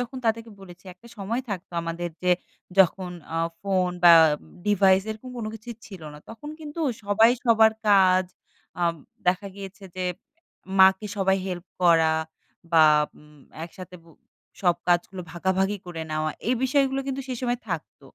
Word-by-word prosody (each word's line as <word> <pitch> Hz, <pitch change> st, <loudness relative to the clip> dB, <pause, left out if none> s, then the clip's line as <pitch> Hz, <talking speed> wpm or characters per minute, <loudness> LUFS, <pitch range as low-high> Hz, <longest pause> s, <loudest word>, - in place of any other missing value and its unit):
যখন 245 Hz, +2 st, -5 dB
তাদেরকে 225 Hz, 0 st, -1 dB
বলেছি 185 Hz, 0 st, -14 dB
একটা 235 Hz, +6 st, -18 dB
সময় 215 Hz, +5 st, -2 dB
থাকত 190 Hz, -3 st, -5 dB
আমাদের 170 Hz, +1 st, -4 dB
যে 180 Hz, -, +2 dB, 0.5 s
যখন 185 Hz, -1 st, +3 dB, 0.2 s
আ -, -, -1 dB, 0.2 s
ফোন 190 Hz, -2 st, 0 dB
বা 175 Hz, -, +9 dB, 0.3 s
উম -, -, -19 dB
device 195 Hz, -2 st, +4 dB
এরকম 220 Hz, +4 st, -8 dB
কোন 225 Hz, -2 st, -4 dB
কিছুই 225 Hz, +1 st, -9 dB
ছিল 190 Hz, -5 st, -11 dB
না। -, -, -11 dB
তখন 260 Hz, +7 st, -10 dB
কিন্তু 300 Hz, +2 st, -7 dB, 0.2 s
সবাই 210 Hz, +3 st, +5 dB
সবার 220 Hz, -2 st, +5 dB, 0.2 s
কাজ 185 Hz, -2 st, +5 dB, 0.6 s
আব 170 Hz, -, +1 dB, 0.3 s
দেখা 185 Hz, +3 st, +1 dB
গিয়েছে 195 Hz, 0 st, -9 dB
যে 185 Hz, -, -2 dB, 0.7 s
মাকে 190 Hz, +2 st, +6 dB
সবাই 190 Hz, -1 st, +2 dB
help 180 Hz, -2 st, -5 dB, 0.2 s
করা 165 Hz, -2 st, +5 dB, 0.6 s
বা 160 Hz, -1 st, +7 dB, 0.3 s
উম 150 Hz, -1 st, -19 dB, 0.2 s
একসাথে 180 Hz, +1 st, -11 dB
বো 165 Hz, -, -19 dB, 0.5 s
সব 175 Hz, -2 st, +3 dB
কাজগুলো 175 Hz, +1 st, +1 dB
ভাগাভাগি 190 Hz, +3 st, 0 dB
করে 165 Hz, -2 st, -6 dB
নেওয়া 155 Hz, 0 st, -1 dB, 0.2 s
এই 255 Hz, -, +3 dB
বিষয়গুলো 270 Hz, 0 st, +2 dB
কিন্তু 270 Hz, 0 st, -3 dB
সে 255 Hz, -, -2 dB
সময় 245 Hz, -1 st, -1 dB
থাকত, -, -, -5 dB
190 Hz, 155 wpm, -25 LUFS, 175-225 Hz, 0.7 s, বা